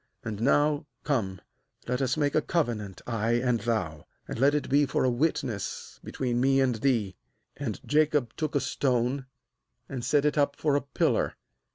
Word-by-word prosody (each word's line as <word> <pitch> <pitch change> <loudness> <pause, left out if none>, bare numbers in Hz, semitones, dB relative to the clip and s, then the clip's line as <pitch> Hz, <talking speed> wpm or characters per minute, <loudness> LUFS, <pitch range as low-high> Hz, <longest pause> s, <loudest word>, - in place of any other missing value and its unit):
And 110 -2 -4
now 145 +3 +2 0.2
come, 100 -11 -1 0.5
let 125 +2 0
us 130 0 +1
make 145 -2 +1
a 155 - +3
cove 150 -8 0
nant, 100 -3 -8
I 115 -1 0
and 120 0 +2
thou; 100 -9 -2 0.2
and - - -5
let 140 +3 +4
it 150 - -1
be 145 +1 +3
for - - 0
a 130 - +3
witness 120 -6 -2
between 120 -2 -1
me 135 +1 +4
and 130 -2 +3
thee.' 110 -5 0 0.4
45And 115 -9 -4
Jacob 150 -5 +2
took 155 -1 -2
a 145 - +3
stone, 130 0 0 0.6
and 130 -3 -5
set 140 +4 +2
it 150 0 +2
up 140 0 +2
for 150 -3 +1
a 145 - +2
pillar. 140 - 0
130 Hz, 180 wpm, -28 LUFS, 115-145 Hz, 0.6 s, let